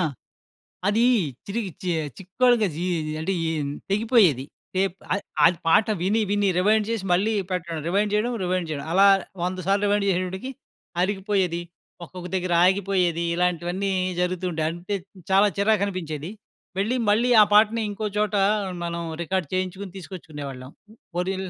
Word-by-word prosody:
ఆ! - - +2 0.9
అది 220 +4 +3 0.4
తిరిగి 200 -2 -3
చి 180 - 0 0.3
చిక్కోలుగా 220 +3 +2
జి 170 - -3 0.4
అంటే 160 +5 -2
ఇయి 165 0 -1 0.4
తెగిపోయేది 205 - +3 0.3
టేప్. 190 -1 +1 0.2
అది 200 - -2 0.2
అది 170 0 +4
పాట 205 +6 +5 0.2
విని 210 +5 +2
విని 205 -1 +2
రివైండ్ 210 +2 +3
చేసి 225 -4 -2
మళ్ళీ 200 +5 +2 0.2
పెట్టడం 170 -3 -3
రివైండ్ 200 +4 +1
చేయడం, 230 +4 +1
రివైండ్ 180 -2 -1
చేయడం 145 -1 -4
అలా 195 +2 +6 0.4
వంద 180 +1 -2
సార్లు 200 +1 +2
రివైండ్ 205 0 +2
చేసేటప్పటికి 185 +6 -2 0.5
అరిగిపోయేది 190 -2 0 0.4
ఒక్కొక్క 180 +1 -8
దగ్గర 185 -1 -1
ఆగిపోయేది 185 -3 +1
ఇలాంటివన్నీ 180 +2 0 0.3
జరుగుతూంటాయి 180 -3 -1
అంటే 175 +4 -4 0.4
చాలా 195 +2 +6
చిరాకనిపించేది 185 -7 0 0.5
వెళ్లి 220 +6 +1
మళ్ళీ 230 +4 +3
ఆ - - +9
పాటని 220 +2 +5
ఇంకో 215 +2 -4
చోట 210 -1 +1 0.5
మనం 170 0 -3 0.2
రికార్డ్ 185 -1 -1
చేయించుకొని 185 +1 -3
తీసుకొచ్చుకునేవాళ్ళం. 145 -8 -8 0.4
పొరిల్ల 185 +1 -2
190 Hz, 135 wpm, -24 LUFS, 175-205 Hz, 0.9 s, ఆ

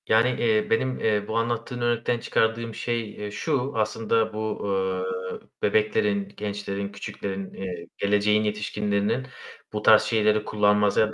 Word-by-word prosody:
Yani, 115 +3 +4
eee, 110 -2 +2
benim, 130 +3 +1
eee, 105 -2 +1
bu 110 - -1
anlattığın 120 +2 -2
örnekten 120 0 +1
çıkardığım 115 0 0
şey, 115 -3 -2
eee, 105 0 -6
şu, 135 +4 -1
aslında 110 0 +1
bu, 110 0 -3 0.7
eee, - - -7 0.2
bebeklerin, 105 -1 +1
gençlerin, 100 -1 -4
küçüklerin, 100 -1 -5
eee, 90 -3 -6
geleceğin 105 +1 +3
yetişkinlerinin 105 +2 -1 0.5
bu 105 - -2
tarz 110 0 +7
şeyleri 110 -1 +2
kullanmasına 105 +1 +3
105 Hz, 130 wpm, -25 LUFS, 105-115 Hz, 0.7 s, tarz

